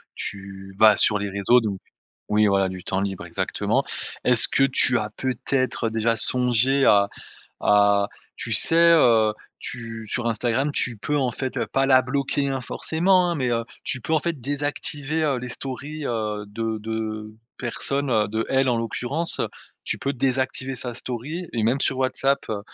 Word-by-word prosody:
tu 95 -1 -8
vas 110 -2 +6
sur 105 -1 +4
les 100 0 -3
réseaux 100 +5 +3
donc 100 -4 -4 0.5
oui, 105 0 +3
voilà, 100 -1 +2
du 90 -1 -8
temps 95 +2 -2
libre 95 -3 -4
exactement. 85 - -1 0.4
Est-ce 125 -2 +9
que 135 - +1
tu 130 -2 +4
as 105 -1 -3
peut-être 130 -3 -2
déjà 115 +1 0
songé 125 +3 +3
à 100 -1 +5 0.5
à 100 0 +3 0.3
tu 115 - -5
sais, 165 +9 +4
heu, 115 -9 +4 0.3
tu 115 -2 -7
sur 120 +2 -2
Instagram 120 +5 0
tu 120 -6 -1
peux 145 +6 -2
en 130 -3 0
fait, 130 +2 -5
heu, - - -1
pas 135 0 0
la 130 -1 +5
bloquer, 140 +2 -1
hein, 135 -1 -2
forcément, 175 +7 +1
hein, - - -1
mais, 130 -3 -1
heu, 115 -1 -1 0.2
tu 130 -4 -1
peux 160 - -4
en 160 - +4
fait 170 -1 -3
désactiver, 145 +2 -2
heu, 140 -4 0
les 125 0 -6
stories, 140 +4 -6
heu, 105 -3 -3
de 110 +2 -4
de 110 0 -5 0.3
personnes, 135 +3 -2
heu, 110 -3 +1
d'elle 130 +5 0
en 120 - +2
l'occurrence. 125 +8 0 0.4
Tu - - -2
peux 140 - -2
désactiver 130 0 -1
sa 125 0 -2
story, 130 +10 -5
et 115 - -1
même 120 +5 +1
sur 130 - 0
WhatsApp, 135 +1 0
heu, 105 -2 -3
120 Hz, 175 wpm, -23 LUFS, 110-135 Hz, 0.5 s, Est-ce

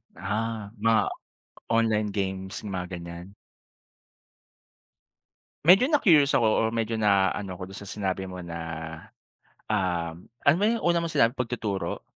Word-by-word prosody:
Ah, 105 +2 -3
mga 115 0 +4 0.7
online 110 -2 +2
games, 95 0 -3
mga 95 -3 -3
ganyan? 85 +3 -9 2.3
Medyo 195 - +7
na-curious 165 - +4
ako 115 - +4
or 110 - +2
medyo 115 0 -1
na-ano 100 -2 +2
ako 90 +2 -8
do'n - - -8
sa 100 - -10
sinabi 95 -2 -3
mo 90 -1 -7
na, 85 -1 -6 1.1
um, 90 -5 -1 0.2
ano 140 - +5
ba 200 - -1
yung 230 +1 +1
una 170 0 +2
mong 170 -1 -2
sinabi, 115 +3 +3
pagtuturo? 110 -8 -3
105 Hz, 130 wpm, -26 LUFS, 95-115 Hz, 2.3 s, Medyo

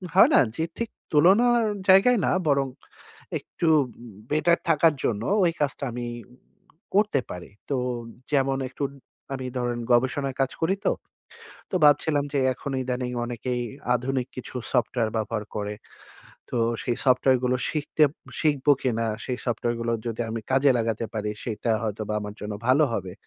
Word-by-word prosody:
হয় - - +8
না? - - +7 0.2
যে 160 - 0
ঠিক 235 -1 -2 0.2
তুলনার 225 +10 +5 0.2
জায়গায় 210 +6 +6
না - - +2 0.2
বরং 140 -2 +3 0.7
একটু 170 - -4 0.2
উম - - -14 0.4
বেটার 170 +3 +3
থাকার 160 0 +5
জন্য 110 -2 0 0.2
ওই 170 - +4
কাজটা 140 -1 -1
আমি 120 +1 -4 0.9
করতে 205 -8 +3
পারি। 90 -1 -8 0.2
তো 140 - +1 0.6
যেমন 135 -1 +2
একটু 135 - -6 0.5
আমি 130 -1 -5
ধরেন 120 -1 -1
গবেষণার 130 +2 +1
কাজ 135 - +1
করি 175 +4 +2
তো। - - +4 0.8
তো - - -1
ভাবছিলাম 145 0 +4
যে 140 - +2
এখন 140 - -6
ইদানিং 125 0 -2
অনেকেই 120 +1 -3 0.3
আধুনিক 125 +1 -1
কিছু 130 - -8 0.2
সফটওয়্যার 120 -2 +1
ব্যবহার 110 0 -2
করে। 105 0 -2 0.8
তো - - -2 0.3
সেই 120 - -1
সফটওয়্যারগুলো 125 -1 +3
শিখতে 150 0 +2 0.4
শিখবো 145 -2 +3
কিনা? 115 -3 0 0.2
সেই 125 -1 -3
সফটওয়্যারগুলো 115 -1 -1
যদি 115 0 -3
আমি 115 0 -3
কাজে 135 +1 +5
লাগাতে 115 0 -1
পারি, 105 -1 -2
সেটা 115 0 -2
হয়তোবা 110 -1 -3
আমার 105 0 -6
জন্য 105 0 -4 0.2
ভালো 140 +4 +5
হবে। 95 -5 -3
130 Hz, 145 wpm, -25 LUFS, 115-145 Hz, 0.9 s, হয়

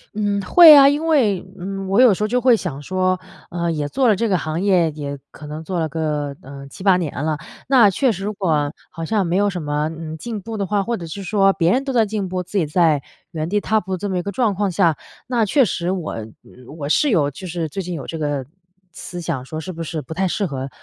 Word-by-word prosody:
嗯 205 -1 0
会 315 - +9
啊， 275 0 +8
因 295 +3 -1
为， 225 - +3 0.2
嗯， 195 +1 -5
我 195 +6 +3
有 240 -6 +7
时 200 - -5
候 210 - +2
就 250 +2 0
会 245 -3 +5
想 145 -8 -5
说， 185 +2 0 0.3
呃， 170 -1 -2
也 150 -2 -2
做 255 - +2
了 210 - +4
这 230 - 0
个 185 -3 +2
行 155 +1 -3
业 180 -5 +3
也 145 -1 -6
可 150 - -11
能 155 +2 -6
做 180 0 -3
了 160 - 0
个， 150 -2 -3
呃， 140 +1 -10
7-8 185 +5 +2
年 150 -4 -3
了， 155 -1 -1 0.3
那 240 -7 +6
确 255 +5 +1
实 195 0 -5
如 210 - -2
果 190 -4 -2
我 145 -1 0 0.2
好 165 -2 -6
像 205 0 0
没 175 +3 0
有 205 0 +2
什 180 -4 -5
么， 150 +1 -1
呃， 160 -1 -6
进 220 +2 -6
步 220 +2 -6
的 200 - -1
话， 205 -1 +1
或 235 +2 -2
者 170 -2 -7
是 195 +5 -7
说 195 0 +3
别 170 -1 +2
人 270 +5 +1
都 270 - -2
在 225 -3 +4
进 205 -2 -3
步 180 0 -3
自 180 +4 -5
己 170 - +2
在 155 -2 +2 0.3
原 155 -1 -3
地 205 +2 0
踏 220 0 +1
步 190 -1 -6
的 - - -1
这 205 +3 -4
么 185 - -1
一 - - 0
个 200 +1 -5
状 220 -2 +1
况 200 +1 -1
下， 170 -3 +2 0.3
那 235 -4 +1
确 270 +5 +3
实 180 -3 -1
我 175 -10 -4 0.6
我 145 -1 -4
是 290 - +3
有 150 -9 +2
就 185 +6 -9
是 165 -2 -3
最 195 - -4
近 180 0 -5
有 140 - -6
这 165 - -6
个 145 -3 -2 0.5
思 175 0 -8
想 140 -7 -3
说 155 +3 -6
是 185 - -6
不 165 -1 -8
是 160 -1 -4
不 160 - -8
太 190 +2 0
适 200 +3 -1
合 135 -4 -4
180 Hz, 280 characters per minute, -20 LUFS, 155-205 Hz, 0.6 s, 会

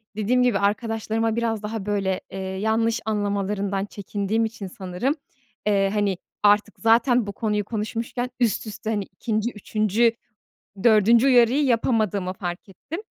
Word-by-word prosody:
dediğim 245 +4 +2
gibi, 235 -5 +2
arkadaşlarıma 225 +1 0
biraz 225 -2 -1
daha 210 -1 -4
böyle, 195 -2 -1
eee, 195 - -6
yanlış 220 +4 0
anlamalarından 200 -2 -1
çekindiğim 205 +2 -2
için 220 -3 -6
sanırım, 185 - -2 0.5
eee, 195 -1 +3
hani, 200 -3 +1 0.3
artık 210 +1 +3
zaten 230 0 +3
bu 200 - -4
konuyu 210 -2 -1
konuşmuşken 230 +3 -3
üst 225 -2 +1
üste, 215 +1 -6
hani, 205 -3 0
2'nci, 215 +5 -2
3'üncü, 215 +2 +1 0.7
4'üncü 230 +2 +5
uyarıyı 255 +2 +5
yapamadığımı 215 -6 +1
fark 180 0 -6
ettim. 300 - -7
215 Hz, 130 wpm, -24 LUFS, 200-230 Hz, 0.7 s, 4'üncü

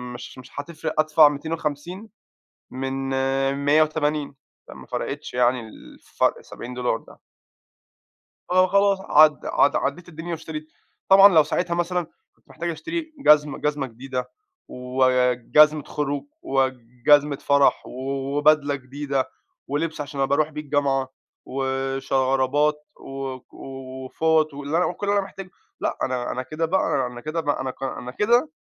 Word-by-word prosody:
مش 125 - -10
مش 130 - -12
هتفرِّق، 160 +1 -5
أدفَع 155 -1 +6
250 160 +6 -5 0.6
من 135 +1 -3 0.7
180، 150 -1 +2 0.3
فما - - -11
فرقِتش - - -5
يعني، 125 0 +2
ال 110 -1 -12
الفرق - - -1
ال70$ 125 -1 -4
ده. - - -17 1.3
فخلاص 195 +2 +4
عد 155 -4 +4
عد 140 - +3
عدِّيت 170 +6 -2
الدنيا 165 +1 -8
واشتريت، 160 -1 -6 0.4
طبعًا 195 -1 +8
لو 155 - +8
ساعتها 170 +4 -1
مثلًا 175 0 -1 0.3
كنت - - -36
محتاج 170 0 -4
أشتري 315 - -5
جزمة- 150 - +4
جزمة 145 -2 -1
جديدة، 125 +2 -6 0.4
وجزمة 130 +4 +3
خروج، 145 -1 -3 0.2
وجزمة 135 +2 +2
فرَح، 140 0 +3
وبدلة 140 +3 +1
جديدة، 135 0 -3 0.4
ولِبس 155 +3 -2
عشان 145 -1 -5
أبقى 135 +1 +2
أرُوح 155 +1 +1
بيه 150 0 -6
الجامعة، 140 -2 0 0.4
وشرابات 135 +2 0
و 135 -1 -6
وفُوَط، 135 +4 -1
واللي 145 +2 -3
أنا 180 - +3
وكل 180 +3 -4
اللي 200 0 +2
أنا 200 - 0
محتاجه. 195 -1 -10 0.3
لأ، - - -2
أنا 125 -2 -2
أنا 130 - -3
كده 155 +5 -3
بقى 180 -6 +1
أنا 125 -1 -8
كده 155 +4 -3
بق 145 -2 -1
أنا 130 0 -3
ك 130 - -14
أنا 130 -2 -4
كده 240 - +2
145 Hz, 130 wpm, -23 LUFS, 135-160 Hz, 1.3 s, طبعًا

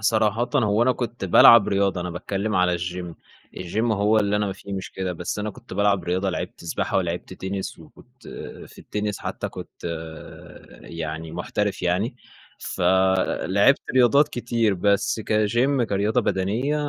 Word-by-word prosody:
صراحةً 110 +2 +1
هو 105 -3 +2
أنا 130 +1 +3
كنت 120 -4 -5
بالعب 105 +4 +7
رياضة، 100 -2 +1
أنا 90 0 -4
باتكلم 100 +4 -3
على 90 -1 +2
الGYM، 90 0 -5 0.4
الGYM 110 +6 -1
هو 105 +2 +3
اللي 105 0 +1
أنا 105 0 0
ما 95 - -2
في 100 +1 -10
مشكلة. 95 -1 -4
بس 90 +4 -4
أنا 105 +1 -2
كنت 120 +2 -14
بالعب 100 -3 +2
رياضة. 95 +2 0
لعبت 90 - -6
سباحة 85 - -2
ولعبت 90 -1 -2
تنس، 95 -1 -5
وكنت 80 - -17 0.4
في - - -18
التنس 105 -1 -4
حتّى - - -4
كنت - - -11 1.0
يعني 80 0 -6
محترف 95 +4 -2
يعني، 95 +8 0 1.1
فلعبت 100 - +2
رياضات 130 +4 +5
كتير، 120 -3 0
بس 100 +4 +1
كGYM 120 +5 +1
كرياضة 105 0 +1
بدنية 110 +10 0
100 Hz, 145 wpm, -23 LUFS, 90-110 Hz, 1.1 s, بالعب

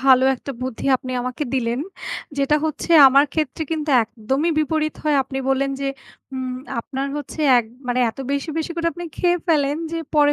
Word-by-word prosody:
ভালো 260 0 +5
১ 250 - -13
টা 275 - -3
বুদ্ধি 255 -3 -5
আপনি 255 0 -7
আমাকে 255 +4 -3
দিলেন। 240 -1 0 0.6
যেটা 280 +2 +3
হচ্ছে 310 +2 -4 0.2
আমার 275 +2 +5
ক্ষেত্রে 310 -1 -1
কিন্তু 310 -1 -3
একদমই 255 +8 -1
বিপরীত 310 0 0
হয়। 300 -1 +3
আপনি 265 +1 -5
বললেন 270 +1 +1
যে 275 - -1 0.5
উম 255 -1 -3 0.3
আপনার 270 +2 -4
হচ্ছে 295 +2 -6 0.2
১ 240 - 0 0.2
মানে 245 0 +1
এত 225 - -25
বেশি, 280 +3 -2
বেশি 320 - -3
করে 335 0 -1
আপনি 350 - -7
খেয়ে 355 0 +2
ফেলেন 290 -3 +2 0.2
যে 335 - -1 0.2
পরে 290 -1 +5
275 Hz, 185 wpm, -21 LUFS, 260-310 Hz, 0.6 s, ভালো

